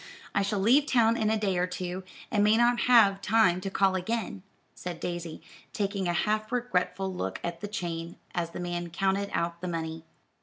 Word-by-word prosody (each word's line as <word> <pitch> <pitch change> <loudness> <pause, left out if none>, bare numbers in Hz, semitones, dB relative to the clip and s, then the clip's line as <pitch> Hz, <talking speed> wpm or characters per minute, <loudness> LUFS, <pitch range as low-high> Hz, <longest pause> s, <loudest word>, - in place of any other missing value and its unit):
I - - +2
shall 200 +1 -1
leave 250 +9 +4
town 230 -4 +4
in 215 -2 +1
a 220 - +2
day 195 -4 0
or 180 - +1
two, 180 0 -5 0.3
and 210 -4 +3
may 210 +1 +5
not 240 0 +3
have 200 -5 +6
time 185 -5 +3
to 195 - -3
call 195 0 +2
again," 205 +2 -2 0.3
said 175 -2 -6
Daisy, 175 -2 -5 0.3
taking 200 -2 -1
a 175 - +1
half 215 +4 0
regretful 195 -5 -1
look 95 - -3
at 170 -1 -4
the 205 - -3
chain, 170 -5 -4 0.2
as 170 -1 -1
the - - -8
man 175 -1 -3
counted 195 +3 0
out 170 0 -2
the 180 - -3
money. 165 -1 -4
190 Hz, 195 wpm, -28 LUFS, 175-215 Hz, 0.3 s, have